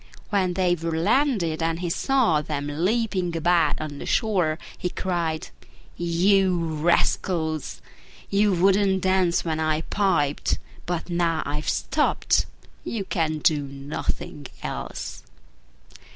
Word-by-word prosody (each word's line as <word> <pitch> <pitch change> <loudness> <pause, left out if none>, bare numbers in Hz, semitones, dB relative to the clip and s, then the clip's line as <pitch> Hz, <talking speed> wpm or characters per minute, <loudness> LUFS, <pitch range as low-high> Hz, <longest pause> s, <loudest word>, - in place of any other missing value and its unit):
When 185 -3 +1
they 180 -1 +3
were 165 -1 -2
landed 200 - +1
and 165 0 0
he 175 -2 -2
saw 240 - +2
them 145 -1 -3
leaping 180 +2 0
about 165 -2 +2
on 150 -2 -5
the - - -6
shore, 180 -8 +1 0.2
he 180 - -3
cried, 170 -4 -2 0.5
"You 180 +2 +3
rascals! 160 -1 0 0.4
you 205 +1 +3
wouldn't 190 +1 +3
dance 185 -3 +2
when 160 -1 -1
I 155 0 +1
piped: 165 -7 +1 0.3
but 175 0 -3
now 170 -2 +1
I've 150 +2 -2
stopped, - - +1 0.4
you 215 -4 -3
can 160 -4 0
do 150 0 +2
nothing 140 0 -5 0.2
else!" - - -5
170 Hz, 120 wpm, -25 LUFS, 155-190 Hz, 0.5 s, they